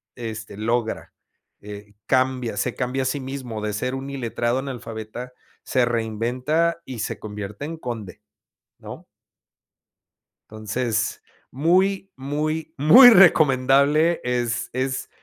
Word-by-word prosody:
este 110 -4 -7
logra, 115 +1 -2 0.5
eh, 105 0 -10
cambia, 130 -4 0
se - - -1
cambia 130 +1 -2
a - - -4
sí 130 +3 -1
mismo 130 -5 -6
de 105 -1 -3
ser 125 +5 -2
un 135 +1 -6
iletrado 120 -1 -2
analfabeta, 120 -2 -7 0.3
se 130 -2 +1
reinventa 120 +9 -1
y 130 -4 -7
se - - -4
convierte 105 +3 -7
en 165 - -5
conde, 115 - -7 0.6
¿no? - - -10 1.5
Entonces 110 +1 -2 0.3
muy, 190 +7 +1
muy, 155 +4 -3
muy 245 - +9
recomendable 150 - +4
es 120 -1 -1
es, 130 +1 -2
125 Hz, 115 wpm, -23 LUFS, 110-140 Hz, 1.5 s, muy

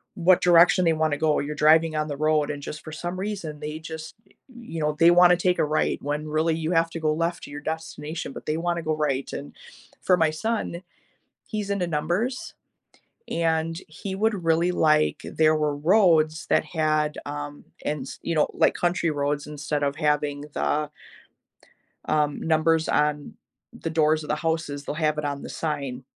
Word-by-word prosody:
what 180 0 +4
direction 175 +1 +5
they 165 - +4
wanna 155 -2 0
go. 155 -1 +2
You're 150 +1 -4
driving 155 +1 +4
on 155 0 -1
the 145 - -4
road, 155 -1 +2
and 145 -1 -4
just 150 - -7
for 155 - -8
some 175 +3 -5
reason, 190 -7 -4
they 150 +1 -5
just, 160 0 -8
eh - - -26 0.2
you 225 -9 -7
know, 150 0 0
they 170 +1 +6
wanna 175 0 +7
take 180 +1 +1
a - - +3
right 150 +1 0
when 150 +2 -3
really 160 +1 +1
you 160 +1 -2
have 165 -1 +2
to 165 - -5
go 155 -1 +2
left 170 +2 -2
to - - -9
your 145 +1 -7
destination, 160 -1 -5
but - - -10
they 155 - -1
wanna 170 0 -1
go 155 -1 -1
right 140 -3 -1
and 140 - -7 0.5
for 180 - +4
my 160 -2 +3
son, 190 0 -3 0.7
he's 210 -2 -4
into 190 -3 0
numbers, 175 - -2 0.8
and 165 0 0
he 190 +5 -7
would 205 -2 0
really 165 +2 +2
like 155 -3 +2
there 155 0 +2
were 150 -1 0
roads 160 -2 +3
that - - +4
had 155 -2 0
um, 145 0 -6 0.2
ens 145 -3 -4
you 170 - -2
know, 150 - +3
like - - +3
country 175 -1 0
roads 145 0 -1
instead 150 0 -3
of 140 0 0
having 150 -2 0
the 150 0 0 1.2
um, 150 -1 0
numbers 160 0 +2
on 150 -1 0 0.4
the 165 - -3
doors 155 -1 +2
of - - -9
the 150 - +1
houses, 160 -3 -2
they'll 150 - -4
have 155 -1 0
it - - -4
on 140 -1 -3
the - - -7
sign, 140 -5 -4
155 Hz, 190 wpm, -25 LUFS, 150-170 Hz, 1.2 s, wanna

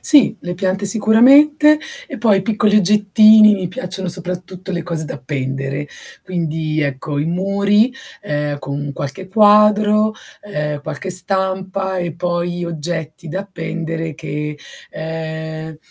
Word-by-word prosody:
Sì, 280 -6 +4
le 175 0 -5
piante 190 +2 -1
sicuramente 280 +9 +5 0.3
e 280 - -6
poi 210 -4 +3
piccoli 210 0 +2
oggettini, 210 +1 +6
mi 185 -3 -4
piacciono 185 +1 -5
soprattutto 180 +1 -5
le 170 -1 -2
cose 160 -2 -3
da - - -6
appendere. 135 +1 -4 0.4
Quindi 160 -4 -2
ecco 145 0 -3
i 145 - 0
muri 200 +6 +1 0.3
ehm, 145 -1 -2
con 145 +1 -5
qualche 145 +8 -6
quadro, 210 +1 +4 0.3
ehm, 150 -7 -4
qualche 155 +5 -6
stampa 190 0 -1
e 175 -2 -3
poi 175 0 -2
oggetti 165 -1 -5
da 185 +5 -3
appendere 165 -3 -5
che 150 0 -5 0.3
ehm 160 0 -6
180 Hz, 125 wpm, -18 LUFS, 155-205 Hz, 0.4 s, oggettini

